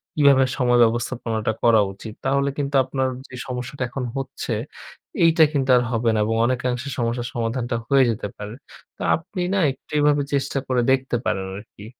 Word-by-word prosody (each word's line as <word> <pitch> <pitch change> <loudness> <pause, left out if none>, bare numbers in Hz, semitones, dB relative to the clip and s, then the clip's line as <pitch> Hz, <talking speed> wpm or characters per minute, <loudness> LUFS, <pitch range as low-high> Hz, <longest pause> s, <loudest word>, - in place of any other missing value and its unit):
কিভাবে 140 -3 +5
সময় 125 -2 +3
ব্যবস্থাপনাটা 115 -1 -1
করা 115 -2 +6
উচিত। 105 +3 -9
তাহলে 140 +1 +2
কিন্তু 140 -1 -2
আপনার 130 0 -1 0.2
যে 130 - -9
সমস্যাটা 125 +2 -4
এখন 130 +1 -4
হচ্ছে 135 -2 -5 0.7
এইটা 165 -1 +6
কিন্তু 135 -2 0
আর - - +3
হবে 115 0 +1
না 110 - +1
এবং 115 +1 0
অনেকাংশে 125 +1 -1
সমস্যার 120 0 -1
সমাধানটা 120 +1 -2
হয়ে 135 +1 +5
যেতে 110 -2 -2
পারে। 105 +1 -7 0.4
তো - - -12
আপনি 180 +3 -6
না 200 - +2
একটু 135 - -16
এভাবে 145 0 +3
চেষ্টা 140 0 0
করে 125 -1 +1
দেখতে 130 -1 +1
পারেন 95 -1 -1
আরকি। 105 0 -11
125 Hz, 170 wpm, -22 LUFS, 115-140 Hz, 0.7 s, করা